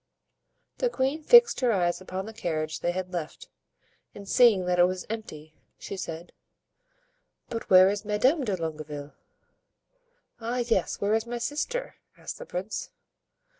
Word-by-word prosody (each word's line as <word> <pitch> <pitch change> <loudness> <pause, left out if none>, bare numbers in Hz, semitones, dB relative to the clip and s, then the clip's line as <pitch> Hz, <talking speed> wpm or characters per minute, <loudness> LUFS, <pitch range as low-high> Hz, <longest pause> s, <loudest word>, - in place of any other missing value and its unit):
The - - +2
queen 275 - -1
fixed 475 +6 +7
her 250 -2 +2
eyes 175 -3 0
upon 185 +1 -5
the 220 - -8
carriage 155 -7 -3
they 175 - 0
had 185 0 -5
left, 165 -3 -6 0.7
and 200 -1 -10
seeing 220 -5 +5
that 180 0 +1
it 175 - +7
was 185 0 -3
empty, 155 -9 -7 0.2
she - - -7
said: 170 -2 -6 1.2
"But 230 -1 -5
where 185 0 +8
is 205 +1 -1
Madame 255 +9 +2
de 205 -6 -1
Longueville?" 150 -3 -6 1.3
"Ah, 235 +2 -3
yes, 225 -6 0
where 205 +1 +1
is 225 +1 0
my 240 0 -3
sister?" 305 - -3 0.2
asked - - -8
the - - -9
prince. 185 +4 -4
195 Hz, 150 wpm, -27 LUFS, 175-240 Hz, 1.3 s, where